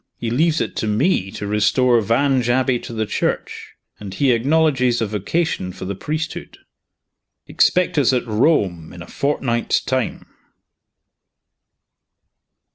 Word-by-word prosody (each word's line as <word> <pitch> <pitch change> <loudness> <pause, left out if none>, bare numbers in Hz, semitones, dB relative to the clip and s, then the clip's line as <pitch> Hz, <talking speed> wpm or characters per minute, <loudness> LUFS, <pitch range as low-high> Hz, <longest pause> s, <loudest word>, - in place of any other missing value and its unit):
He 115 - -4
leaves 160 +5 +2
it - - -3
to 110 - -1
me 105 - +1
to 105 - -6
restore 115 +4 +2
Vange 125 +3 +1
Abbey 130 0 +2
to - - -9
the 110 -1 -2
Church; - - -3 0.2
and 100 -2 -8
he 140 -2 +2
acknowledges 130 -1 +2
a 115 - 0
vocation 105 - -2
for 95 - -8
the 100 - -3
priesthood. 155 - -5 0.9
Expect 180 -4 +2
us 135 - +3
at 125 -2 0
Rome 105 - 0
in 85 -1 -9
a - - -14
fortnight's 130 -4 -1
time." 130 -2 -3
120 Hz, 130 wpm, -20 LUFS, 105-140 Hz, 0.9 s, us